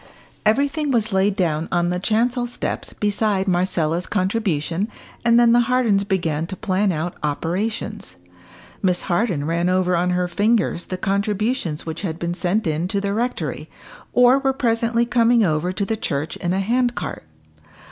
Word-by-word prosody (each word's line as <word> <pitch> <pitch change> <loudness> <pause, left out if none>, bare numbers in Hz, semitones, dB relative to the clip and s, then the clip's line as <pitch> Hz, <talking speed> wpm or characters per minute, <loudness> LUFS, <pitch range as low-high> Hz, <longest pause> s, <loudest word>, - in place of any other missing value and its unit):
Everything 285 +6 +1
was 220 -5 0
laid 190 +1 +2
down 165 -5 0
on 175 0 +1
the 180 - -1
chancel 240 +5 +1
steps 240 - -4
beside 205 -1 0
Marcella's 175 -2 0
contribution, 185 -3 -1 0.4
and 235 0 +5
then 235 -1 +5
the 240 - +5
Hardens 230 -6 +3
began 165 -6 -1
to 190 - -6
plan 195 -1 0
out 170 +1 -2
operations. 175 +9 -3 0.7
Miss 180 -2 +1
Harden 180 -5 0
ran 170 +2 0
over 185 -1 +2
on 175 +1 +1
her 180 0 +1
fingers 200 0 +1
the 185 - -4
contributions 200 -3 -1
which 160 -1 -5
had 165 -5 -3
been 170 0 -2
sent 190 +4 0
in 160 +2 -1
to 200 +1 -1
the 200 0 -2
rectory, 240 +4 -3 0.4
or 250 +2 +5
were 270 -1 +1
presently 235 -1 +1
coming 235 -1 +3
over 160 +2 0
to 200 +2 -2
the 225 - -1
church 155 -7 -3
in 175 - -2
a 190 - +1
hand 240 +4 +1
cart. - - -5
195 Hz, 165 wpm, -21 LUFS, 175-230 Hz, 0.7 s, and